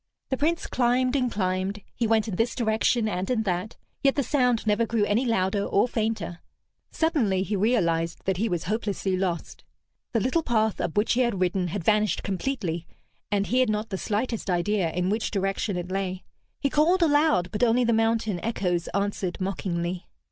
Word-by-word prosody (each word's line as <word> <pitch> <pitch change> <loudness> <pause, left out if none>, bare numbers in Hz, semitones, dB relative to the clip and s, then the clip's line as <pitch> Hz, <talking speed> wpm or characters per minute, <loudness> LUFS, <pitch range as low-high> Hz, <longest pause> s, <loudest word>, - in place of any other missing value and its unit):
The 265 - 0
Prince 325 +5 0
climbed 250 +1 +1
and 250 -3 +1
climbed, 190 +1 -1
he 235 - -1
went 220 0 +2
in 205 - -3
this 225 +5 0
direction 225 0 +1
and 185 -2 -2
in 235 -3 +1
that, 185 +1 -2 0.2
yet 275 -1 +3
the 280 - +1
sound 250 -4 +1
never 215 +2 +2
grew 225 -2 +1
any 225 +5 +1
louder 200 -2 +1
or 200 - +2
fainter. 215 -7 -2 0.5
Suddenly 230 - +1
he 205 +2 -2
realized 170 -6 +1
that 190 -2 0
he 220 +4 0
was 175 -3 -1
hopelessly 200 -1 -1
lost. 185 -3 -3 0.5
The 230 - +3
little 260 +9 +1
path 220 -6 +1
up 165 - -3
which 210 - +3
he 250 - +2
had 235 -6 0
ridden 180 0 +1
had 185 +1 -4
vanished 215 +2 +2
completely, 190 -6 -2 0.4
and 200 -1 +1
he 250 +4 +1
had 255 - +3
not 215 +1 -1
the 190 - -3
slightest 220 0 -2
idea 180 0 +1
in 180 +3 0
which 215 +1 -1
direction 195 0 -1
it 180 +1 -5
lay. 190 -1 -2 0.4
He 280 - 0
called 340 +5 +3
aloud, 290 - +3
but 210 - -3
only 245 +1 +4
the 235 -1 +2
mountain 225 -4 +1
echoes 180 -6 -1
answered 200 -2 -1
mockingly. 175 -1 -3
210 Hz, 185 wpm, -26 LUFS, 185-235 Hz, 0.5 s, only